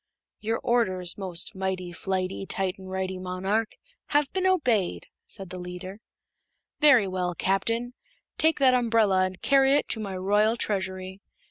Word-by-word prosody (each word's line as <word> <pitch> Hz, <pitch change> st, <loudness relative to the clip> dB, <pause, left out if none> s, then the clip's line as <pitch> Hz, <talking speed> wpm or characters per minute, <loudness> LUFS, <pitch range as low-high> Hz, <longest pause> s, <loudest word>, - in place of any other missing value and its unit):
"Your 225 Hz, +1 st, -1 dB
orders, 185 Hz, -7 st, 0 dB
most 185 Hz, 0 st, -2 dB
Mighty, 190 Hz, -2 st, -3 dB
Flighty, 190 Hz, +1 st, -3 dB
Tight 190 Hz, -1 st, -2 dB
and 190 Hz, 0 st, -10 dB
Righty 190 Hz, 0 st, -3 dB
Monarch, 190 Hz, +4 st, -1 dB, 0.3 s
have 290 Hz, -1 st, +1 dB
been 375 Hz, 0 st, +1 dB
obeyed," 230 Hz, -, +1 dB, 0.2 s
said 190 Hz, -2 st, -7 dB
the 185 Hz, -, -6 dB
leader. 180 Hz, +3 st, -8 dB, 0.8 s
"Very 255 Hz, -9 st, +6 dB
well, 180 Hz, -2 st, -2 dB
Captain. 230 Hz, +7 st, 0 dB, 0.5 s
Take 320 Hz, 0 st, +3 dB
that 265 Hz, -2 st, +5 dB
umbrella 225 Hz, -6 st, +3 dB
and 185 Hz, 0 st, -10 dB
carry 270 Hz, -1 st, +4 dB
it -, -, +1 dB
to 220 Hz, -, +1 dB
my 195 Hz, -3 st, -4 dB
Royal 210 Hz, +4 st, +2 dB
Treasury. 190 Hz, -2 st, -3 dB
195 Hz, 145 wpm, -26 LUFS, 185-230 Hz, 0.8 s, Very